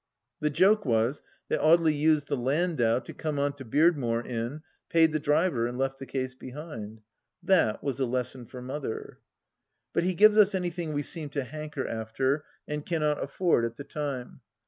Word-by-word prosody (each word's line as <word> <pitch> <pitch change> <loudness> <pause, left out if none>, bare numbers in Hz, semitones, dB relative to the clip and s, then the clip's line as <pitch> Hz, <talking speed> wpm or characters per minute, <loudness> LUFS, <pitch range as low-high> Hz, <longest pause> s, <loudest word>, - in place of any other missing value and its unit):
The 150 - +1
joke 195 +8 +4
was, 120 +2 +1 0.3
that - - +1
Audely 160 -1 +5
used 150 -1 +2
the - - 0
landau 135 -2 +1
to 130 - -7
come 155 -2 -3
on 140 0 +1
to 140 -1 -10
Beardmore 130 -3 +2
in, 125 +5 -4 0.3
paid 165 -1 +5
the 155 - 0
driver, 150 -5 +2
and 120 +1 -5
left 135 0 -1
the 135 - -8
case 130 -1 -3
behind 125 -5 -8
I - - -40 0.4
That 165 - +3
was 140 -2 -2
a 130 - +1
lesson 125 0 -3
for 125 +1 -9
Mother. 130 -2 -5 0.7
But - - +2
he 185 0 0
gives 215 +3 +6
us 205 -1 +5
anything 175 -3 -2
we 145 0 -1
seem 155 0 -5
to 140 -1 -2
hanker 150 0 -5
after 130 +6 -1 0.2
and 150 0 -3
cannot 150 -3 0
afford 165 -3 +1
at 115 0 -2
the 140 - -7
time. 140 -4 -5
145 Hz, 185 wpm, -28 LUFS, 125-160 Hz, 0.7 s, gives